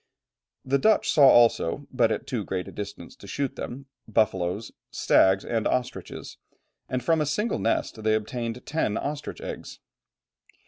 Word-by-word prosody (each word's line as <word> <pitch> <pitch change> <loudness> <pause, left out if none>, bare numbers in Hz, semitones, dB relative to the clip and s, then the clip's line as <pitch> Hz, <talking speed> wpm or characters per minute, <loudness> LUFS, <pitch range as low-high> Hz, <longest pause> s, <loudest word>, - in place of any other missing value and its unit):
] - - -49
The 140 - +5
Dutch 220 +10 +3
saw 145 -3 +7
also, 120 +1 +4
but 120 -3 +2
at - - -2
too 120 -6 -2
great 95 -1 -3
a - - -8
distance 100 -1 -8
to - - -13
shoot 140 -2 -2
them, 135 +3 -6 0.2
buffalos, 105 -2 0 0.2
stags, 95 0 +3
and 115 -2 0
ostriches, 125 -1 -3 0.5
and 125 -1 -2
from 160 +4 +2
a - - +1
single 210 +9 0
nest 115 0 -1
they 110 0 +2
obtained 115 +2 -4
ten 145 -9 -1
ostrich 145 +1 -4
eggs. - - -7
120 Hz, 155 wpm, -26 LUFS, 110-140 Hz, 0.5 s, saw